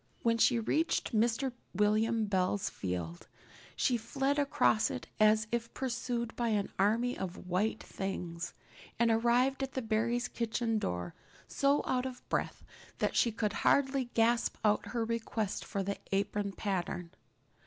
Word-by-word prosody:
When 230 -1 +2
she 245 +1 +5
reached 310 +6 0
Mr. 235 +4 +2 0.2
William 215 +2 +2
Bell's 190 - 0
field 90 -6 -4 0.5
she 245 - +2
fled 270 +5 0
across 275 -6 +3
it - - -5
as 215 0 +5
if 235 0 -2
pursued 240 -2 -2
by 240 - 0
an 210 -3 0
army 230 +5 +2
of 185 -1 -6
white 205 +5 0
things, 180 -3 -5 0.4
and 235 0 +3
arrived 240 +4 +3
at 270 0 -3
the 260 - -1
Barry 225 +2 +1
kitchen 230 -2 -1
door 90 - -3 0.3
so 280 +1 +2
out 255 0 0
of 255 -1 -10
breath - - -2 0.3
that - - 0
she 235 - +3
could 215 -1 -1
hardly 270 -1 +3
gasp 235 +1 +2
out 210 0 +2
her 235 -2 -1
request 225 -2 -2
for 195 - -3
the 200 +1 -3
apron 200 0 0
pattern. 180 -4 -3
225 Hz, 145 wpm, -32 LUFS, 200-240 Hz, 0.5 s, she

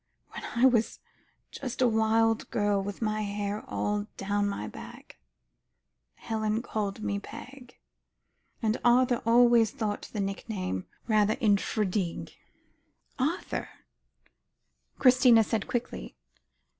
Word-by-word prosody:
"When - - -8
I 240 +2 +4
was 235 -4 +2 0.5
just 255 -3 -6
a 255 - +5
wild 225 0 +2
girl 205 -2 +1
with 205 +3 -5
my 215 0 0
hair 205 0 -3
all 205 0 -2
down 205 +1 0
my 105 - -4
back, - - -11 1.0
Helen 220 0 -2
called 210 -2 -3
me 200 -1 -1
Peg. 255 +4 -11 0.9
And 220 +1 +1
Arthur 245 0 +4
always 235 -1 +5
thought 210 0 -4
a - - -1
nickname 195 - -3 0.2
rather 215 0 +3
infra 210 -2 +2
dig." 185 -2 -3 0.9
"Arthur?" 300 +8 -2 1.3
Christina 250 -3 +6
said 220 -1 -2
quickly. 240 0 -4
215 Hz, 110 wpm, -28 LUFS, 205-235 Hz, 1.3 s, Christina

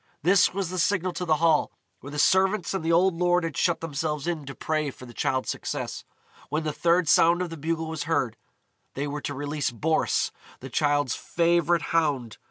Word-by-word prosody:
This 180 +3 +5
was 185 -2 -3
the 185 - -3
signal 185 0 +1
to 180 - -4
the 160 -2 +3
Hall, 160 -1 +2 0.3
where 140 - -10
the 145 - -7
servants 190 +4 +3
and 190 -4 -2
the 165 - +1
old 180 +2 +4
lord 175 +1 +2
had 165 -4 -3
shut 170 +1 +1
themselves 150 -2 -3
in 165 -4 -3
to 135 - -7
pray 155 -2 -1
for 130 - -11
the 120 - -12
Childe's 130 +2 -1
success. - - -5 0.4
When 155 +1 -1
the 155 -1 -2
third 170 +1 +2
sound 170 +3 +5
of 175 - -6
the - - -5
bugle 160 +1 -2
was 160 -1 -4
heard, 140 -8 0 0.6
they 140 - -2
were 145 0 -4
to 145 - -4
release 145 +1 -2
Boris, 155 +7 0 0.3
the 130 0 -9
Childe's 145 -2 +1
favourite 170 -1 +1
hound. 140 -9 0
160 Hz, 200 wpm, -26 LUFS, 145-175 Hz, 0.6 s, This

